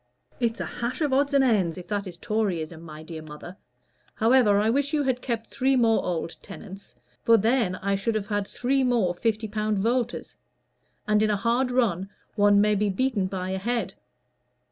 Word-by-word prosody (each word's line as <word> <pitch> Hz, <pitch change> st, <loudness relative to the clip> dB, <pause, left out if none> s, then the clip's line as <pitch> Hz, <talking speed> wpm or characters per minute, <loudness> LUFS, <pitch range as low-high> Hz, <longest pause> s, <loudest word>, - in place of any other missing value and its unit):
"It's 235 Hz, -2 st, 0 dB
a -, -, -2 dB
hash 235 Hz, +1 st, -4 dB
of 290 Hz, -3 st, +1 dB
odds 280 Hz, +2 st, +2 dB
and 275 Hz, -, +5 dB
ends, 195 Hz, -10 st, +2 dB
if 180 Hz, -, -9 dB
that 205 Hz, -1 st, -2 dB
is 175 Hz, -2 st, -8 dB
Toryism, 175 Hz, -7 st, -2 dB
my 155 Hz, -2 st, -10 dB
dear 160 Hz, 0 st, -8 dB
mother. 155 Hz, +4 st, -10 dB, 0.6 s
However, 225 Hz, -3 st, +4 dB
I 210 Hz, -, +2 dB
wish 280 Hz, +5 st, +1 dB
you 295 Hz, -, +1 dB
had 255 Hz, -2 st, 0 dB
kept 230 Hz, -3 st, -3 dB
three 265 Hz, +3 st, +1 dB
more 230 Hz, -3 st, +3 dB
old 165 Hz, -1 st, -3 dB
tenants; 195 Hz, -1 st, -11 dB, 0.3 s
for 230 Hz, 0 st, +5 dB
then 225 Hz, -3 st, +1 dB
I 200 Hz, +1 st, -2 dB
should 210 Hz, +3 st, -1 dB
have 210 Hz, -2 st, -1 dB
had 205 Hz, -1 st, -2 dB
three 265 Hz, +2 st, 0 dB
more 235 Hz, -8 st, +2 dB
fifty 220 Hz, +3 st, -1 dB
pound 215 Hz, 0 st, -1 dB
voters. 240 Hz, +4 st, -1 dB, 0.7 s
And, 210 Hz, 0 st, +3 dB
in 215 Hz, -, +2 dB
a 210 Hz, -, +1 dB
hard 240 Hz, +5 st, +1 dB
run, 200 Hz, -7 st, 0 dB, 0.2 s
one 205 Hz, -1 st, +4 dB
may 210 Hz, +1 st, +4 dB
be 205 Hz, 0 st, +1 dB
beaten 205 Hz, -1 st, 0 dB
by 185 Hz, -1 st, -4 dB
a 190 Hz, -, -2 dB
head. 225 Hz, -2 st, -2 dB
215 Hz, 190 wpm, -26 LUFS, 190-240 Hz, 0.7 s, and